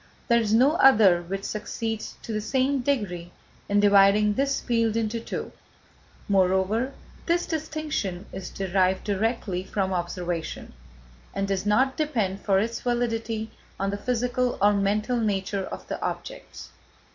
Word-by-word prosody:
There 235 Hz, 0 st, +5 dB
is 215 Hz, -2 st, -1 dB
no 250 Hz, +6 st, +5 dB
other 205 Hz, -9 st, +6 dB
which 195 Hz, +3 st, -5 dB
succeeds, 215 Hz, +1 st, -4 dB
to 225 Hz, -, -5 dB
the 215 Hz, -, -1 dB
same 265 Hz, +5 st, +1 dB
degree, 205 Hz, -10 st, -2 dB, 0.4 s
in 205 Hz, 0 st, +3 dB
dividing 205 Hz, +1 st, +5 dB
this 275 Hz, +3 st, 0 dB
field 230 Hz, -2 st, 0 dB
into 225 Hz, 0 st, -1 dB
two, 230 Hz, -, -5 dB, 0.8 s
moreover, 195 Hz, +6 st, +2 dB, 0.3 s
this 345 Hz, +1 st, +2 dB
distinction 305 Hz, -, -3 dB
is 190 Hz, -1 st, -6 dB
derived 190 Hz, 0 st, 0 dB
directly 205 Hz, -2 st, -1 dB
from 190 Hz, 0 st, -2 dB
observation, 175 Hz, -1 st, -4 dB, 0.6 s
and 195 Hz, 0 st, -1 dB
does 195 Hz, 0 st, -1 dB
not 260 Hz, +6 st, +2 dB
depend 220 Hz, -11 st, -1 dB
for 195 Hz, -2 st, +2 dB
its 225 Hz, +4 st, -1 dB
validity 225 Hz, -2 st, -1 dB, 0.3 s
on 195 Hz, +1 st, 0 dB
the -, -, -2 dB
physical 250 Hz, +2 st, -1 dB
or 205 Hz, +1 st, +5 dB
mental 210 Hz, +4 st, +1 dB
nature 200 Hz, -3 st, -1 dB
of -, -, -8 dB
the -, -, -5 dB
objects. -, -, -6 dB
210 Hz, 140 wpm, -26 LUFS, 195-240 Hz, 0.8 s, other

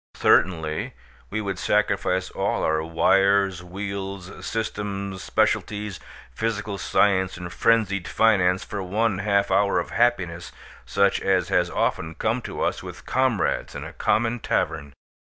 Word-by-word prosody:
Certainly, 80 Hz, -4 st, +2 dB, 0.3 s
we 110 Hz, +1 st, -2 dB
would 95 Hz, -3 st, -4 dB
sacrifice 95 Hz, -3 st, +1 dB
all -, -, -1 dB
our 80 Hz, 0 st, +1 dB
wires, 95 Hz, +3 st, +2 dB
wheels, 95 Hz, 0 st, -6 dB
systems, 100 Hz, -2 st, -3 dB
specialties, 105 Hz, -2 st, 0 dB, 0.3 s
physical 105 Hz, -, -3 dB
science 95 Hz, -3 st, +2 dB
and 90 Hz, -1 st, -7 dB
frenzied 100 Hz, -6 st, +2 dB
finance 95 Hz, -3 st, +3 dB
for 100 Hz, -, -5 dB
one 100 Hz, +2 st, 0 dB
half 100 Hz, -1 st, +1 dB
hour 100 Hz, +1 st, +3 dB
of -, -, -5 dB
happiness 90 Hz, -8 st, 0 dB, 0.4 s
such 100 Hz, 0 st, +2 dB
as 95 Hz, -3 st, +1 dB
has 90 Hz, 0 st, +2 dB
often 80 Hz, -2 st, -1 dB
come 115 Hz, +3 st, -1 dB
to -, -, -4 dB
us -, -, -1 dB
with -, -, -10 dB
comrades 130 Hz, -6 st, 0 dB
in -, -, -5 dB
a -, -, -8 dB
common 115 Hz, +2 st, +1 dB
tavern. 70 Hz, -8 st, -2 dB
100 Hz, 135 wpm, -24 LUFS, 90-105 Hz, 0.4 s, finance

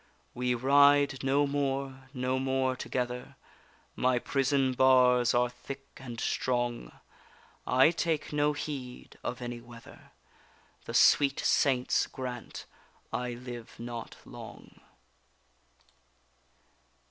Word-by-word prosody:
We 125 Hz, 0 st, 0 dB
ride 140 Hz, +2 st, +4 dB
no 140 Hz, +2 st, +3 dB
more, 135 Hz, -1 st, -3 dB
no 130 Hz, -1 st, -1 dB
more 130 Hz, -1 st, 0 dB
together; 125 Hz, -1 st, -4 dB, 0.6 s
My 125 Hz, 0 st, +2 dB
prison 135 Hz, +1 st, +1 dB
bars 125 Hz, -2 st, +4 dB
are 125 Hz, 0 st, +3 dB
thick 135 Hz, +3 st, -9 dB
and 120 Hz, -3 st, -8 dB
strong, 120 Hz, -1 st, -1 dB, 0.8 s
I 130 Hz, +5 st, +5 dB
take 160 Hz, -3 st, -2 dB
no 150 Hz, 0 st, +2 dB
heed 135 Hz, -4 st, -7 dB
of 125 Hz, 0 st, -4 dB
any 120 Hz, -1 st, -5 dB
weather, 120 Hz, -1 st, -15 dB, 0.7 s
The -, -, -6 dB
sweet 140 Hz, -1 st, +5 dB
Saints 130 Hz, -3 st, +2 dB
grant 125 Hz, -2 st, -7 dB, 0.5 s
I 125 Hz, 0 st, -2 dB
live 120 Hz, -1 st, -9 dB
not 120 Hz, -1 st, -7 dB
long. -, -, -12 dB
130 Hz, 100 wpm, -30 LUFS, 125-135 Hz, 0.8 s, I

